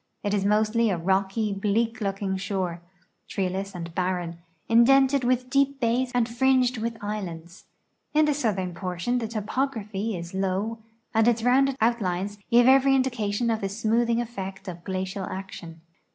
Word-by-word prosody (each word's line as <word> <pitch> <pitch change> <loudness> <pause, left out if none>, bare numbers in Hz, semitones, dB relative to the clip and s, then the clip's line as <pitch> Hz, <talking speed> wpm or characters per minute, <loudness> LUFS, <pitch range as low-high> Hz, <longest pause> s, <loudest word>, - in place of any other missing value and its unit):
It 205 - -1
is 200 -2 +1
mostly 215 +3 +2
a 185 - 0
rocky, 195 +4 0
bleak 220 +4 0
looking 195 -1 -1
shore, 190 -3 -3 0.5
treeless 195 +1 -3
and 170 -1 -6
barren, 180 -2 -2 0.3
indented 265 +3 +5
with 250 0 +1
deep 275 0 +2
bays 245 +1 +1
and 240 -2 +2
fringed 255 0 +2
with 230 +1 -3
islands. 180 -4 -6 0.5
In 305 0 +4
the 300 - +2
southern 200 -10 -1
portion 180 +7 -2
the 225 - -3
topography 215 -2 -2
is 170 +1 -8
low 195 +4 -1 0.3
and 225 0 +3
its 230 -1 +2
rounded 265 +2 +3
outlines 205 -3 0
give 240 0 +5
every 270 +1 +6
indication 235 -3 0
of 220 - -1
the 195 - -1
smoothing 230 +3 +1
effect 195 -4 -6
of 175 -2 -7
glacial 190 0 -3
action. 175 -4 -8
215 Hz, 150 wpm, -26 LUFS, 190-240 Hz, 0.5 s, every